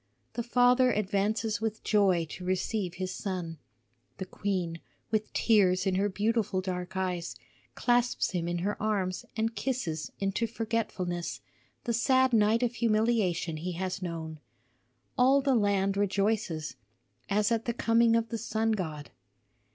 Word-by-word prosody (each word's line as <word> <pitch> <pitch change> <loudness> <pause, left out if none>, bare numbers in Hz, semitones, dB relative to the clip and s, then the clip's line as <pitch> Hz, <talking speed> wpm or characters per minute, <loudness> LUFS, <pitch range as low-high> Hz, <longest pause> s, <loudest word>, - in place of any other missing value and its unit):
The 240 - -2
father 245 +1 +4
advances 210 +1 0
with 220 -1 -3
joy 190 -5 +3
to 180 - -7
receive 185 0 -1
his 185 0 -3
son. 175 -5 -4 0.6
The 190 - -4
queen, 185 -4 -3 0.3
with 215 -1 0
tears 185 -5 +3
in 190 - +1
her 195 +2 +1
beautiful 210 0 0
dark 185 0 -4
eyes, 180 -2 -2 0.4
clasps 245 0 +1
him 175 -2 -2
in 175 0 -1
her 205 - -2
arms 195 -4 -1
and 225 +1 0
kisses 195 - -2
into 195 +4 0
forgetfulness 215 -6 -3 0.4
the 235 - -1
sad 260 +2 +3
night 220 +2 +4
of 240 -1 0
humiliation 215 -8 +1
he 175 +3 -4
has 185 +2 -3
known. 160 -3 -5 0.8
All 265 +3 +6
the 275 -1 +2
land 200 -3 +2
rejoices 200 -6 0 0.5
as 210 +2 +2
at 230 -1 0
the 235 - 0
coming 230 0 +3
of 230 0 0
the 230 - -3
sun 225 0 0
god. 160 -8 -4
205 Hz, 145 wpm, -29 LUFS, 185-230 Hz, 0.8 s, All